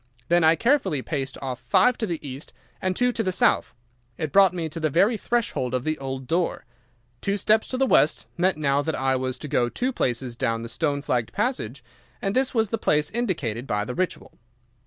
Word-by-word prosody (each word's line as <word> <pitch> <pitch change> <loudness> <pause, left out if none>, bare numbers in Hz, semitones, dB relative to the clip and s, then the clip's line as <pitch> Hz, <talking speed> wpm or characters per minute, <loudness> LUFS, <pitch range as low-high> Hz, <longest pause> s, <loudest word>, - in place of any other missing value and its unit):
Then 175 0 +4
I 160 +1 +6
carefully 195 - +1
paced 135 -4 -3
off 130 -2 -4
five 225 - +3
to 220 - -1
the 165 -5 -4
east 135 +3 -8 0.3
and 185 0 0
two 245 +3 +2
to 230 - -2
the 190 -4 0
south. 155 -8 +2 0.4
It 155 -2 -3
brought 195 -2 +6
me 170 -3 -3
to 160 +2 -6
the 155 -1 +1
very 195 - +3
threshold 210 - -1
of 125 - -1
the 155 +1 -2
old 135 -1 -5
door. 170 +5 -1 0.6
Two 200 +1 0
steps 215 +2 +2
to 255 - -3
the 270 - +3
west 155 - +3
meant 185 -1 +1
now 140 -2 +2
that 160 +1 -2
I 130 0 +1
was 130 0 -2
to 150 - -7
go 120 -3 +1
two 255 - -2
paces 125 - -1
down 115 -1 -1
the 115 - -6
stone 145 0 -1
flagged 120 -5 -1
passage, 140 - -2 0.4
and 195 +1 -2
this 260 0 +2
was 225 -4 +1
the 225 - -2
place 150 -4 +1
indicated 160 - -2
by 105 -3 -1
the 125 - -4
Ritual. 185 +6 -3
155 Hz, 215 wpm, -25 LUFS, 130-200 Hz, 0.6 s, I